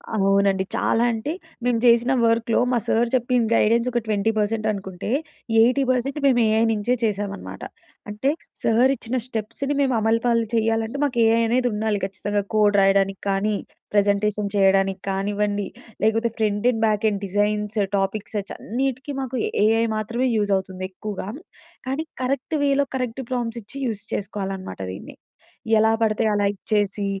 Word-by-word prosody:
అవునండి. 195 -1 +2
చాలా 230 - +2
అంటే 230 +6 -3 0.3
మేము 245 -2 +2
చేసిన 235 +1 +5
వర్క్‌లో 230 0 +2
మా 245 - +2
సార్ 235 +1 +2
చెప్పింది 245 -2 +1
గైడెన్స్ 230 +2 +3
ఒక 240 - +1
20% 215 +1 0
అనుకుంటే, 190 -2 -6 0.5
80% 255 +2 +2
మేము 250 -3 +4
ఏఐ 220 +1 +3
నుంచే 215 +3 0
చేశాం 205 -2 0
అనమాట. - - -9 0.5
అంటే 210 +6 -1 0.3
సార్ 240 +4 +4
ఇచ్చిన 255 0 -3
స్టెప్స్‌ని 250 +5 -3
మేము 265 -2 +2
అమలుపాలు 230 +1 +2
చేయాలంటే 225 +3 0
మాకు 250 -4 -1
ఏఐ 225 +1 +4
అనేది 245 +2 +2
ఉండాలి 210 -1 0
ఖచ్చితంగా. 205 +1 -2
కోడ్ 210 -1 +4
రాయడానికి 195 0 +2
కానీ, 200 +2 +1 0.4
ప్రజెంటేషన్ 205 0 +1
చేయడానికి 195 -1 +3
కానివ్వండి 205 +1 -1 0.4
లేకపోతే 225 +2 +2
front 210 -1 0
end, 225 -2 -3
back 215 0 0
end 200 -1 -3
designs, 210 +2 0 0.2
topics 200 +2 -2
చ్ - - -9
అన్నిటికి 265 +4 -3
మాకు 260 -1 -4 0.3
ఏఐ 225 +1 +3
మాత్రమే 235 +4 -1
యూజ్ 205 -1 0
అవుతుంది. 190 -1 -6
ఎక్కువగా 200 0 -6 0.6
కానీ 270 +4 -1 0.2
కరెక్ట్‌ 275 +4 -1
వేలో, 280 0 +3
కరెక్ట్ 255 0 -3
ప్రాంప్ట్స్ 240 -2 -2
ఇచ్చి 240 +7 -8
యూజ్ 215 -3 -3
చేసుకోవాలనమాట 195 - -4
దీన్ని. 95 - -9 0.6
ఎలా 220 +1 +4
పడితే 220 0 +2
అలా 205 -1 +1
ఇచ్చేసి 205 0 -1
220 Hz, 145 wpm, -23 LUFS, 205-235 Hz, 0.6 s, చేసిన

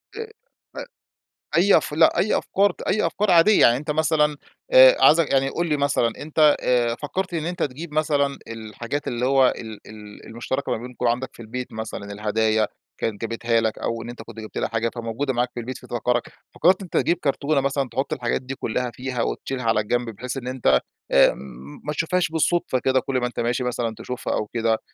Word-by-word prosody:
أ 450 0 -6 0.4
ف - - -14 0.8
أي 190 +4 +6
أف - - 0
لأ 160 +2 +4
أي 210 - +2
أفكار 200 -1 +1
أي 210 -3 +2
أفكار 200 +5 0
عادية 180 +5 +6
يعني 120 - +6
أنت 150 +4 -5
مثلًا، 150 -1 +2 0.4
آآ - - +9
عايزك 160 -1 +5
يعني 135 0 +3
قُل 170 +5 -2
لي 150 - +1
مثلًا 140 -4 +1
أنت 150 0 +4
آآ، 120 -2 +2
فكّرت 180 +5 -3
إن 160 -1 -2
أنت 175 0 -3
تجيب 150 +4 -4
مثلًا، 145 -3 +1
الحاجات 115 +5 -5
اللي 120 +1 -1
هو 135 -1 +4
ال 110 -2 -8
ال 105 -1 -12
المشتركة 125 +4 -3
ما - - -1
بينكم 125 +1 -5
عندك 120 +2 0
في - - -12
البيت 125 +3 -6
مثلًا، 110 -2 -6
الهدايا 110 +1 +1 0.3
كانت 105 -3 -2
جابتها 115 0 0
لك 110 -1 -1
أو 115 0 -3
إن 115 - -8
أنت 120 -1 -9
كنت 115 0 -10
جبت 110 - -7
لها - - -1
حاجة، 115 +1 -1
فموجودة 120 +4 -2
معاك 125 0 0
في 120 - -4
البيت 130 +2 -6
فتفكّرك، 120 0 -2 0.2
فكّرت 185 +4 +3
إن - - -6
أنت 180 - -5
تجيب 175 - +2
كرتونة 140 +1 +1
مثلًا 135 0 -1
تحط 135 +4 -2
الحاجات 120 0 -1
دي 130 +1 -6
كُلّها 125 0 -2
فيها 125 +1 -4
وتشيلها 130 +1 -3
على 115 -2 +2
جنب 120 +2 -1
بحيث 125 +5 -6
إن 130 -2 -6
أنت، 120 - +2 0.3
آآ - - +5
م 65 +2 -11
ما 150 - -2
تشوفهاش 175 +3 0
بالصدفة 160 -3 +1
كده 130 +1 +2
كل 130 0 -2
ما 125 - 0
أنت 125 - -4
ماشي 120 +2 0
مثلًا 120 -2 -2
تشوفها 125 - -4
أو 105 - -1
كده، 115 +1 0
أ - - -3
125 Hz, 205 wpm, -23 LUFS, 115-150 Hz, 0.8 s, آآ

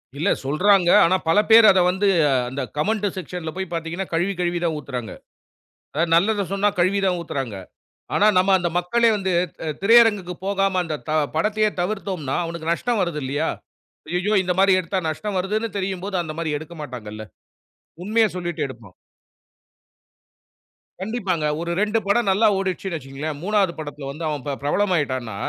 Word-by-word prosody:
இல்ல 165 +8 0 0.2
சொல்றாங்க. 180 +5 +3 0.2
ஆனா 185 +3 +3
பலபேர் 220 +5 +6
அத 190 - +3
வந்து, 190 +2 0 0.4
அந்த 135 +2 -4 0.2
கமெண்ட் 210 +6 0
செக்க்ஷன்ல 175 -2 -5
போய் 190 -2 -5
பாத்தீங்கன்னா, 165 +3 -3
கழுவி 175 +4 +1
கழுவி 175 -1 0
தான் 165 -2 0
ஊத்துறாங்க. 125 -6 -6 0.8
அதாவது 165 +3 0
நல்லத 200 +3 +2
சொன்னா, 205 +1 +2
கழுவி 185 +3 +2
தான் 180 -2 +1
ஊத்துறாங்க. 135 -9 -4 0.6
ஆனா 210 - +4
நம்ம 185 +2 +2
அந்த 175 - -1
மக்களே 230 +6 +2
வந்து, 190 -2 -1 0.5
திரையரங்குக்கு 210 -4 +5
போகாம 195 -1 +1
அந்த 155 -2 -3
த - - 0 0.2
படத்தையே 215 +5 +1
தவிர்த்தோம்ன்னா, 185 -7 -3
அவனுக்கு 165 -1 -4
நஷ்டம் 235 +4 -1
வருது 170 -4 -2
இல்லையா? 145 +4 -1 0.6
ஐயய்யோ! 185 +4 0
இந்த 180 - +1
மாரி 195 0 +5
எடுத்தா 185 +2 -2
நஷ்டம் 195 +4 -3
வருதுன்னு 215 +5 -1
தெரியும்போது, 190 0 -3
அந்த 155 - -6
மாரி 160 -2 -2
எடுக்க 160 +3 -11
மாட்டாங்கள்ல. 110 -6 -7 0.8
உண்மய 220 +3 +3
சொல்லிட்டு 175 -2 -3
எடுப்பான். 115 -7 -12 2.1
கண்டிப்பாங்க, 190 -6 -2 0.2
ஒரு 170 0 -3
2 210 +1 +1
படம் 200 +1 +2
நல்லா 220 +4 +4
ஓடிட்ச்சுன்னு 190 -2 -3
வச்சிக்கங்களேன், 140 +2 -6
3ஆவது 200 -3 +1
படத்துல 145 -2 -7
வந்து 155 +4 -8
அவன் 150 -4 -3
பி 140 - -1
பிரபலம் 190 +6 +1
ஆயிட்டான்ன்னா, 130 -8 -2
180 Hz, 150 wpm, -22 LUFS, 155-200 Hz, 2.1 s, பலபேர்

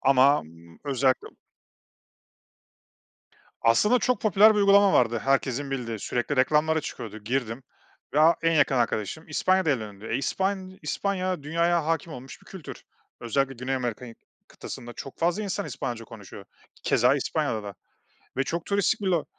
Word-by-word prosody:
Ama 135 +2 +4 0.4
özellikle 135 -2 +1 2.3
Aslında 210 - +4
çok 250 -1 0
popüler 215 +1 +6
bir - - +1
uygulama 200 -1 +5
vardı 115 +1 +3
herkesin 135 0 0
bildiği, 120 -4 -3
sürekli 120 +7 -2
reklamları 155 +4 +3
çıkıyordu. 115 -7 -7
Girdim 115 +2 -3 0.5
ve 150 - +4
a 165 +2 +6
en 165 0 +3
yakın 140 -4 +3
arkadaşım 120 +5 -1
İspanya'da 185 +2 +2
evlendi. 110 -5 -4
E, - - +1
İspan 190 +5 -2
İspanya 185 -4 -2
dünyaya 170 +2 +1
hâkim 165 0 -1
olmuş 130 -1 -10
bir - - -23
kültür. 190 -5 -10 0.4
Özellikle 135 +3 0
Güney 125 +2 -3
Amerika'yı 120 -2 -4 0.3
kıtasında 120 0 -9
çok 135 - -9
fazla 175 +5 +1
insan 200 0 -3
İspanyolca 120 -4 -5
konuşuyor. 105 -3 -11 0.4
Keza - - +3
İspanya'da 110 - -1
da. 100 -1 -7 0.6
Ve 135 - +2
çok 165 +3 -3
turistik 200 0 +1
bir 200 - -3
lo 175 -4 +1
140 Hz, 140 wpm, -26 LUFS, 120-180 Hz, 2.3 s, popüler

